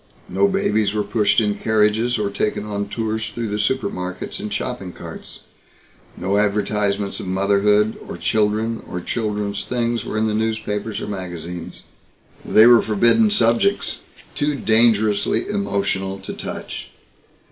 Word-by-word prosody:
No 200 Hz, -, +3 dB
babies 190 Hz, -, +1 dB
were 105 Hz, -, +1 dB
pushed 105 Hz, +1 st, +2 dB
in 105 Hz, -2 st, +1 dB
carriages 110 Hz, +3 st, +1 dB
or 105 Hz, -2 st, -1 dB
taken 105 Hz, +1 st, -1 dB
on 100 Hz, -1 st, -3 dB
tours 110 Hz, -1 st, -2 dB
through 115 Hz, -2 st, -4 dB
the 105 Hz, +1 st, -2 dB
supermarkets 100 Hz, -6 st, -2 dB
in 105 Hz, -, -4 dB
shopping 105 Hz, -2 st, -4 dB
carts. -, -, -10 dB, 0.8 s
No 95 Hz, +3 st, +1 dB
advertisements 105 Hz, -1 st, 0 dB
of -, -, -6 dB
motherhood, 100 Hz, +3 st, +2 dB
or -, -, -5 dB
children, 110 Hz, +1 st, 0 dB
or 90 Hz, -, -4 dB
children's 105 Hz, 0 st, -2 dB
things 120 Hz, -1 st, -1 dB
were -, -, -4 dB
in 110 Hz, -, +2 dB
the 110 Hz, -, 0 dB
newspapers 110 Hz, -1 st, -2 dB
or -, -, -4 dB
magazines. 90 Hz, -3 st, -6 dB, 0.6 s
They 110 Hz, -, +6 dB
were 120 Hz, -1 st, +8 dB
forbidden 120 Hz, -, +3 dB
subjects 200 Hz, -, +2 dB, 0.3 s
too 145 Hz, 0 st, 0 dB
dangerously 110 Hz, -3 st, +2 dB
emotional 100 Hz, -, -1 dB
to 95 Hz, -, -6 dB
touch. -, -, -7 dB
105 Hz, 135 wpm, -21 LUFS, 100-115 Hz, 0.8 s, were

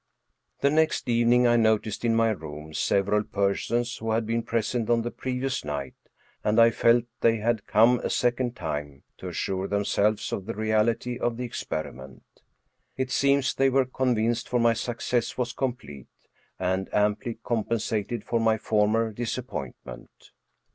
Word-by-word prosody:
The 140 Hz, -, +3 dB
next 155 Hz, -3 st, +1 dB
evening 120 Hz, +1 st, +4 dB
I 120 Hz, 0 st, +4 dB
noticed 110 Hz, -1 st, +1 dB
in 115 Hz, -1 st, +2 dB
my 115 Hz, 0 st, +3 dB
room 80 Hz, -5 st, -7 dB
several 100 Hz, +5 st, +1 dB
persons 110 Hz, +5 st, -1 dB
who 115 Hz, -, -5 dB
had 115 Hz, 0 st, 0 dB
been 115 Hz, +1 st, 0 dB
present 115 Hz, 0 st, -1 dB
on 115 Hz, -1 st, +3 dB
the 120 Hz, -, -3 dB
previous 130 Hz, +1 st, -3 dB
night, 70 Hz, -3 st, -4 dB, 0.5 s
and 105 Hz, +2 st, +2 dB
I 115 Hz, 0 st, +7 dB
felt 115 Hz, +1 st, +3 dB, 0.2 s
they 115 Hz, 0 st, +3 dB
had 110 Hz, -1 st, -1 dB
come 115 Hz, +3 st, +5 dB
a -, -, -3 dB
second 120 Hz, 0 st, 0 dB
time 75 Hz, -, -5 dB, 0.2 s
to -, -, -7 dB
assure 95 Hz, 0 st, -2 dB
themselves 100 Hz, +1 st, 0 dB
of 95 Hz, -, -4 dB
the 115 Hz, -, -4 dB
reality 110 Hz, +3 st, 0 dB
of 120 Hz, -2 st, -1 dB
the 125 Hz, -, -3 dB
experiment. 70 Hz, -, -6 dB, 0.7 s
It 130 Hz, -1 st, -2 dB
seems 140 Hz, -1 st, +2 dB
they 135 Hz, 0 st, +3 dB
were 135 Hz, 0 st, +3 dB
convinced, 120 Hz, -3 st, 0 dB
for 125 Hz, -, +1 dB
my 115 Hz, 0 st, +4 dB
success 120 Hz, 0 st, -2 dB
was 125 Hz, -1 st, -2 dB
complete, 120 Hz, -, -5 dB, 0.5 s
and 95 Hz, +1 st, -1 dB
amply 105 Hz, +3 st, 0 dB
compensated 115 Hz, -1 st, -2 dB
for 115 Hz, -, 0 dB
my 110 Hz, -1 st, +2 dB
for 105 Hz, -1 st, +2 dB
mer 115 Hz, +1 st, +1 dB
disappointment. 120 Hz, -, -7 dB
115 Hz, 155 wpm, -26 LUFS, 105-120 Hz, 0.7 s, I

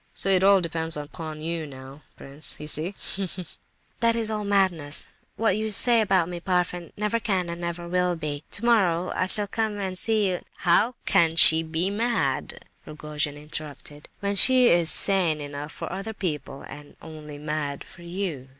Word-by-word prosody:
So -, -, 0 dB
it 185 Hz, -1 st, +3 dB
all 195 Hz, -1 st, +5 dB
depends 160 Hz, -1 st, -2 dB
upon 155 Hz, +1 st, -7 dB
you 165 Hz, -1 st, -3 dB
now, 135 Hz, +1 st, -12 dB
prince, 140 Hz, +3 st, -3 dB
You 150 Hz, -, -7 dB
see! 155 Hz, +6 st, 0 dB, 0.2 s
Ha, 195 Hz, -1 st, -2 dB
ha!" 185 Hz, -, -6 dB, 0.6 s
"That's 230 Hz, -1 st, +1 dB
all 210 Hz, -1 st, -3 dB
madness. 185 Hz, -7 st, 0 dB, 0.3 s
What 225 Hz, -1 st, +1 dB
you 220 Hz, 0 st, -2 dB
say 230 Hz, +2 st, +4 dB
about 190 Hz, -5 st, +2 dB
me, 175 Hz, -1 st, -6 dB
Parfen, 180 Hz, -1 st, -2 dB
never 210 Hz, +2 st, -1 dB
can 190 Hz, -6 st, -1 dB
and 170 Hz, +1 st, -6 dB
never 170 Hz, 0 st, -5 dB
will 180 Hz, 0 st, 0 dB
be. 150 Hz, -2 st, -5 dB
Tomorrow, 195 Hz, -6 st, +1 dB
I 185 Hz, -, -1 dB
shall 210 Hz, +2 st, 0 dB
come 215 Hz, 0 st, -2 dB
and 190 Hz, -2 st, -4 dB
see 215 Hz, +1 st, +1 dB
you—" 180 Hz, -2 st, -1 dB, 0.3 s
"How 210 Hz, +8 st, +3 dB
can 165 Hz, -4 st, +3 dB
she 160 Hz, 0 st, +8 dB
be 165 Hz, +4 st, -2 dB
mad," 230 Hz, +3 st, -2 dB, 0.2 s
Rogojin 150 Hz, -1 st, -3 dB
interrupted, 150 Hz, -1 st, -7 dB
"when 200 Hz, 0 st, -1 dB
she 255 Hz, +4 st, +8 dB
is 170 Hz, -1 st, +3 dB
sane 180 Hz, -6 st, +2 dB
enough 145 Hz, +1 st, -6 dB
for -, -, -7 dB
other 195 Hz, +4 st, -5 dB
people 150 Hz, -8 st, -4 dB
and 145 Hz, 0 st, -12 dB
only 155 Hz, -2 st, -10 dB
mad 150 Hz, -1 st, -4 dB
for 175 Hz, -, -15 dB
you? 170 Hz, -7 st, -5 dB
175 Hz, 175 wpm, -25 LUFS, 155-200 Hz, 0.6 s, she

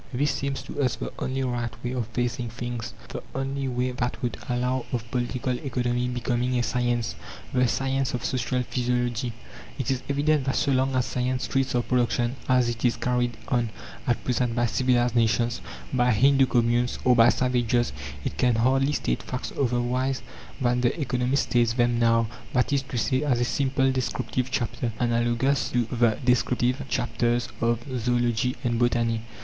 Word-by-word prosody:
This 140 Hz, +3 st, +1 dB
seems 140 Hz, 0 st, -3 dB
to -, -, -4 dB
us 125 Hz, -3 st, +1 dB
the -, -, -6 dB
only 130 Hz, +1 st, -1 dB
right 120 Hz, -2 st, -1 dB
way 120 Hz, -, -2 dB
of 125 Hz, -4 st, -2 dB
facing 120 Hz, 0 st, -2 dB
things. 120 Hz, -1 st, -5 dB
The -, -, -5 dB
only 135 Hz, 0 st, -2 dB
way 125 Hz, 0 st, -1 dB
that 125 Hz, 0 st, -2 dB
would 120 Hz, -, -1 dB
allow 125 Hz, +1 st, 0 dB
of 120 Hz, -4 st, -1 dB
Political 125 Hz, 0 st, -1 dB
Economy 125 Hz, -2 st, -1 dB
becoming 125 Hz, 0 st, 0 dB
a 120 Hz, -, +1 dB
science 120 Hz, -1 st, 0 dB, 0.4 s
the 125 Hz, -1 st, +3 dB
Science 135 Hz, +4 st, 0 dB
of 120 Hz, 0 st, -4 dB
Social 130 Hz, -1 st, 0 dB
Physiology. 125 Hz, 0 st, -1 dB, 0.5 s
It 130 Hz, -1 st, -1 dB
is 130 Hz, -1 st, -1 dB
evident 145 Hz, 0 st, +2 dB
that 135 Hz, -, 0 dB
so 140 Hz, -, +1 dB
long 130 Hz, 0 st, +2 dB
as 125 Hz, -1 st, +2 dB
science 125 Hz, 0 st, -1 dB
treats 135 Hz, -2 st, 0 dB
of 120 Hz, -, 0 dB
production, 120 Hz, 0 st, +1 dB
as 125 Hz, -1 st, +4 dB
it 120 Hz, -1 st, -3 dB
is 120 Hz, -2 st, +2 dB
carried 120 Hz, -1 st, 0 dB
on 120 Hz, -2 st, +1 dB, 0.4 s
at 120 Hz, -, +1 dB
present 125 Hz, -2 st, 0 dB
by 120 Hz, 0 st, +2 dB
civilized 125 Hz, 0 st, +2 dB
nations, 115 Hz, 0 st, +2 dB, 0.3 s
by 125 Hz, -1 st, +3 dB
Hindoo 135 Hz, +4 st, +5 dB
communes, 120 Hz, 0 st, +2 dB
or 125 Hz, -1 st, +6 dB
by 115 Hz, -1 st, +7 dB
savages, 120 Hz, -1 st, +1 dB, 0.3 s
it -, -, -4 dB
can 125 Hz, -2 st, +3 dB
hardly 135 Hz, +5 st, +2 dB
state -, -, -1 dB
facts -, -, -5 dB
otherwise 125 Hz, +1 st, 0 dB, 0.4 s
than 125 Hz, -1 st, +1 dB
the 125 Hz, +6 st, +1 dB
economists 125 Hz, 0 st, +1 dB
state 120 Hz, -1 st, +2 dB
them 120 Hz, -1 st, +2 dB
now; 115 Hz, -1 st, +4 dB, 0.3 s
that 125 Hz, +2 st, +2 dB
is 140 Hz, -, +3 dB
to 130 Hz, -2 st, -6 dB
say, 130 Hz, +4 st, +1 dB
as 135 Hz, -5 st, +1 dB
a 120 Hz, -, +2 dB
simple 135 Hz, 0 st, +1 dB
descriptive 130 Hz, 0 st, -2 dB
chapter, 120 Hz, -2 st, -2 dB
analogous 120 Hz, +2 st, +1 dB
to 120 Hz, -1 st, +1 dB
the 115 Hz, -3 st, +2 dB
descriptive 125 Hz, +1 st, +2 dB
chapters 120 Hz, 0 st, 0 dB
of 115 Hz, 0 st, +1 dB, 0.2 s
Zoology 120 Hz, +1 st, +1 dB
and 120 Hz, -2 st, 0 dB
Botany. 115 Hz, -2 st, +1 dB
125 Hz, 175 wpm, -26 LUFS, 120-130 Hz, 0.5 s, by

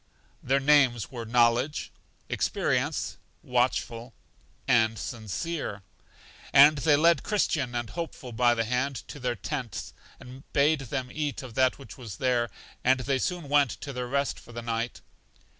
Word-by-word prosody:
Their 135 Hz, +2 st, +2 dB
names 135 Hz, -5 st, +3 dB
were 120 Hz, -3 st, -6 dB
Knowledge, 120 Hz, +4 st, +2 dB, 0.4 s
Experience, -, -, -1 dB, 0.3 s
Watchful, 120 Hz, -1 st, -1 dB, 0.5 s
and 110 Hz, -1 st, +3 dB
Sincere, 110 Hz, -, -4 dB, 0.7 s
and 145 Hz, +2 st, +7 dB
they 150 Hz, +1 st, +4 dB
led 160 Hz, -1 st, +4 dB
Christian 140 Hz, -, 0 dB
and 120 Hz, -2 st, -3 dB
Hopeful 160 Hz, -6 st, -6 dB
by 120 Hz, +1 st, +3 dB
the 115 Hz, -, +1 dB
hand 125 Hz, +4 st, 0 dB
to 145 Hz, -, -8 dB
their 125 Hz, -2 st, -1 dB
tents, 125 Hz, 0 st, -5 dB, 0.3 s
and 130 Hz, +1 st, -11 dB
bade 150 Hz, +2 st, +4 dB
them 130 Hz, 0 st, -4 dB
eat 150 Hz, -2 st, -3 dB
of 125 Hz, -3 st, -9 dB
that 130 Hz, +1 st, +2 dB
which 135 Hz, -1 st, -12 dB
was 110 Hz, -6 st, -7 dB
there, 120 Hz, -2 st, +1 dB, 0.3 s
and 130 Hz, +1 st, +3 dB
they 135 Hz, +1 st, 0 dB
soon 175 Hz, +1 st, -2 dB
went 145 Hz, -1 st, +4 dB
to 140 Hz, -, -6 dB
their 125 Hz, -1 st, -3 dB
rest 140 Hz, +2 st, -1 dB
for -, -, -15 dB
the 120 Hz, 0 st, -6 dB
night. 115 Hz, +1 st, -3 dB
130 Hz, 150 wpm, -27 LUFS, 120-140 Hz, 0.7 s, and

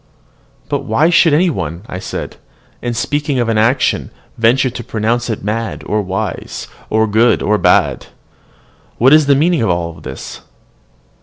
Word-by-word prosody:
"But -, -, -1 dB
why 150 Hz, +10 st, +2 dB
should 170 Hz, -1 st, +5 dB
any 170 Hz, +4 st, +3 dB
one," 85 Hz, -, -5 dB, 0.2 s
said -, -, -5 dB, 0.5 s
I, -, -, -5 dB
"in 120 Hz, -, -1 dB
speaking 145 Hz, +4 st, -1 dB
of 120 Hz, -2 st, 0 dB
an 110 Hz, -1 st, +1 dB
action, 125 Hz, +5 st, +1 dB, 0.3 s
venture 125 Hz, +3 st, +2 dB
to 120 Hz, -, -7 dB
pronounce 115 Hz, +3 st, -1 dB
it 110 Hz, -, -3 dB
mad 110 Hz, +2 st, -3 dB
or 105 Hz, 0 st, 0 dB
wise, 95 Hz, +2 st, -4 dB, 0.2 s
or 110 Hz, 0 st, +2 dB
good 110 Hz, +3 st, +2 dB
or 105 Hz, 0 st, +2 dB
bad? -, -, +2 dB, 0.9 s
What 130 Hz, +4 st, +5 dB
is 155 Hz, -2 st, +5 dB
the 140 Hz, -, +5 dB
meaning 165 Hz, +1 st, +2 dB
of 110 Hz, -, +1 dB
all 85 Hz, -1 st, -1 dB
this? -, -, -9 dB
115 Hz, 160 wpm, -16 LUFS, 105-135 Hz, 0.9 s, should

